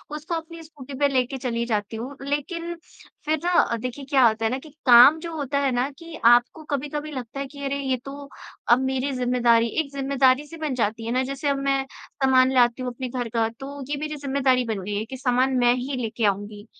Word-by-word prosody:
उसको 305 +3 -5
अपनी 330 0 -7
स्कूटी 285 -4 -12
पे 285 - +4
लेके 265 -1 0
चली 235 -2 -2
जाती 215 -2 -2
हूँ। 255 +5 -6
लेकिन 335 +5 -3 0.5
फिर 310 0 +1
ना 350 - +1
अ, 235 - -1
देखिए 255 +4 -6
क्या 265 -3 +5
होता 225 0 0
है 220 - +1
ना 255 - -1
कि 310 - -14 0.2
काम 250 +5 +8
जो 335 0 -6
होता 280 -2 -1
है 275 -1 +1
ना 250 +2 0
कि 335 -1 -10
आपको 240 +6 +4
कभी-कभी 295 +2 -3
लगता 255 -1 -6
है 275 - -2
कि 280 +1 -10
अरे 275 +1 -2
ये 265 -2 -1
तो 280 0 -8 0.4
अब 240 - +6
मेरी 265 +1 -1
ज़िम्मेदारी 245 -2 +2
एक 280 -3 -9
ज़िम्मेदारी-सी 275 +2 +1
बन 310 -3 -3
जाती 225 -1 -1
है 230 - -3
ना। 255 +2 +1
जैसे 275 +2 -4
अब 280 - +1
मैं 275 -1 +1 0.4
सामान 260 -1 +5
लाती 245 0 +3
हूँ 250 -1 -3
अपने 255 +1 -5
घर 245 -1 -4
का, 225 0 +1
तो 275 +4 -9
ये 290 - -1
मेरी 305 0 -4
ज़िम्मेदारी 270 -3 +1
बन 220 -4 -3
गई 205 +2 -4
है, 210 +2 -2
कि 260 +3 -8
सामान 255 0 +1
मैं 245 -1 +4
ही 260 +2 -4
लेके 225 0 -2
आऊँगी। 205 +1 -2
265 Hz, 225 wpm, -24 LUFS, 240-285 Hz, 0.5 s, काम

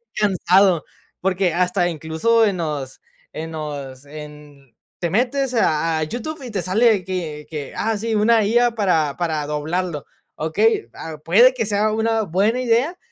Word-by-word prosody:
cansado. 190 -3 +3 0.4
Porque 185 -2 +1
hasta 180 0 +1
incluso 165 +9 +1
en 200 -3 0
los 150 -6 -4 0.3
en 160 +1 -6
los 145 -4 -6
en 150 -3 -12 0.2
te 170 - -1
metes 255 - 0
a 160 -6 +1
a - - 0
YouTube 250 - -5
y 245 - -7
te 195 -4 -2
sale 210 +2 +3
que 165 -5 -5
que, 150 -3 -6
ah 220 -1 -1
sí, 225 +2 -2
una 220 +1 +4
IA 240 +3 +3
para 165 -9 +1
para 160 -4 -1
doblarlo, 155 +1 -3 0.3
¿okey? 160 - +1
Ah, 160 -1 -8
puede 235 +10 +6
que 230 -3 -1
sea 210 +1 +1
una 225 +1 +1
buena 205 +8 +1
idea, 255 +9 +1
180 Hz, 155 wpm, -21 LUFS, 155-225 Hz, 0.4 s, puede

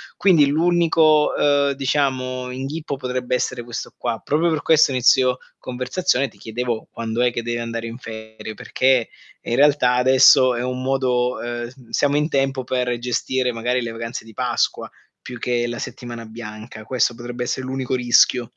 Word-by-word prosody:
Quindi 170 -7 +4
l'unico, 160 0 +3
ehm, 145 -1 +3
diciamo 130 -2 -1
inghippo 140 +3 -4
potrebbe 125 -1 -3
essere 125 -1 -2
questo 120 0 -6
qua. 120 -2 -3
Proprio 160 +4 +1
per 155 - -1
questo 155 -3 +4
a - - -2
inizio 125 0 +4 0.2
conversazione 130 +3 -1
ti - - -23
chiedevo 115 0 -4
quando 115 +1 -3
è 120 - +3
che 120 - -3
devi 120 0 -2
andare 115 0 -4
in 115 - -7
ferie, 110 -2 -9
perché, 130 -1 +1 0.3
eh - - -8
in 120 - +1
realtà 140 -4 +4
adesso 130 0 +6
è 120 - -2
un 125 0 -3
modo, 125 -2 0
ehm 120 0 -4
s 125 -2 -18
siamo 145 +4 +1
in 150 +2 0
tempo 135 -1 0
per 125 -1 -1
gestire 125 +1 -1
magari 120 +2 -1
le 115 - -4
vacanze 115 0 -6
di 110 - -14
Pasqua - - -1 0.3
più 125 -1 -9
che 120 0 0
la 120 -1 -5
settimana 120 -1 -7
bianca. 110 0 -9
Questo 125 -1 +1
potrebbe 120 +1 -6
essere 130 +1 -3
l'unico 130 0 -2
rischio. 120 0 +4
125 Hz, 175 wpm, -21 LUFS, 120-135 Hz, 0.3 s, adesso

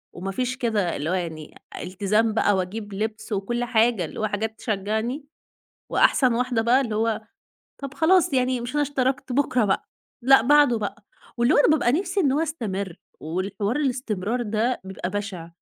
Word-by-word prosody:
وما 190 +2 -4
فيش 255 +5 -2
كده 220 -8 0
اللي 150 +3 -3
هو - - 0
يعني 165 -4 -4 0.3
التزام 210 +4 +1
بقى. 205 -2 +2
وأجيب 200 +3 -4
لِبس 215 +2 -4
وكل 240 +5 -1
حاجة، 230 -5 +2
اللي - - -8
هو 215 - +1
حاجات 220 +2 -3
تشجّعني، 220 +6 -2 0.7
وأحسن 255 -3 +4
واحدة 245 -1 0
بقى 240 +4 +4
اللي 225 -5 -3
هو 225 0 0 0.6
طَب 275 -1 -6
خلاص 340 0 +3
يعني، 255 -1 +1
مش 240 +3 -6
أنا 295 - +2
اشتركت، 270 -1 -1
بُكرة 255 -3 +2
بقى، 195 -2 0 0.4
لا، 270 -1 +7
بعده 285 -2 +5
بقى. 205 -1 -5 0.3
واللي 240 +1 +3
هو - - +4
أنا - - +5
بابقى 295 -6 +3
نفسي 370 +5 0
إنه 275 -7 +2
هو - - +2
يستمِرّ، 200 - -3 0.2
والحوار 195 +7 -2
الاستمرار 245 -5 -1
ده 225 +3 -1
بيبقى 190 -1 -5
بشع، 195 -4 -5
225 Hz, 175 wpm, -24 LUFS, 200-255 Hz, 0.7 s, لا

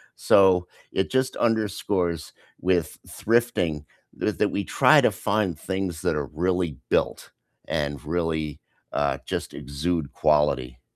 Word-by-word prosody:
So 95 -2 +4 0.3
it 95 - 0
just 130 0 +1
underscores 100 -6 0 0.3
with 90 -3 0
thrifting 105 -10 0 0.4
th 105 - -1
that 105 - +2
we 100 - -1
try - - +5
to - - +4
find 100 -6 -1
things 95 -3 -3
that - - +1
are 75 -2 -2
really 90 -2 0
built - - 0 0.4
and 70 -1 -2
really, 80 -2 -2 0.3
uh, 70 -1 +1
just - - -4
exude 75 +1 -3
quality. 75 -4 +1
85 Hz, 125 wpm, -25 LUFS, 75-95 Hz, 0.4 s, try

